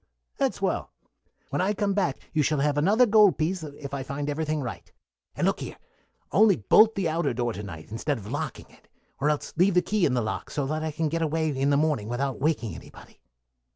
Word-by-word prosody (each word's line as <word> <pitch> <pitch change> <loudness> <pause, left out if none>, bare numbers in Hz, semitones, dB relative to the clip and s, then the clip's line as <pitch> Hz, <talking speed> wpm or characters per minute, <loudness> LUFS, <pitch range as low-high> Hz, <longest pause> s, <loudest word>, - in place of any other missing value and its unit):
"That's - - 0
well. - - -1 0.6
When - - 0
I 195 +3 +1
come 205 -2 0
back 190 -9 0 0.2
you 155 - +2
shall 150 +1 +1
have 145 0 +1
another 200 +12 +4
gold 210 - +5
piece 170 +4 -1
if 145 -2 -8
I 140 - -2
find 140 +2 -3
everything 155 +1 -1
right. 125 - -7 0.4
And - - 0
look - - +1
here: - - -7 0.5
only 210 -1 +5
bolt 215 - +5
the 195 -4 0
outer 155 -5 0
door 120 -1 -1
to 105 - -6
night 85 -5 -9
instead 135 +6 -2
of 105 - -10
locking 145 -1 -4
it, - - -22 0.3
or 145 +2 +2
else 150 -1 -2
leave 180 +2 +4
the 180 - +4
key 205 0 +2
in 130 - 0
the 120 - +1
lock, 110 -3 -4
so 145 - -2
that 155 +3 -2
I 160 - -1
can 155 +1 -1
get 165 +2 -2
away 160 0 0
in 135 +1 +1
the 140 - +3
morning 145 -8 0
without 135 +2 -2
waking 135 -7 0
anybody." - - -13
150 Hz, 225 wpm, -26 LUFS, 135-170 Hz, 0.6 s, gold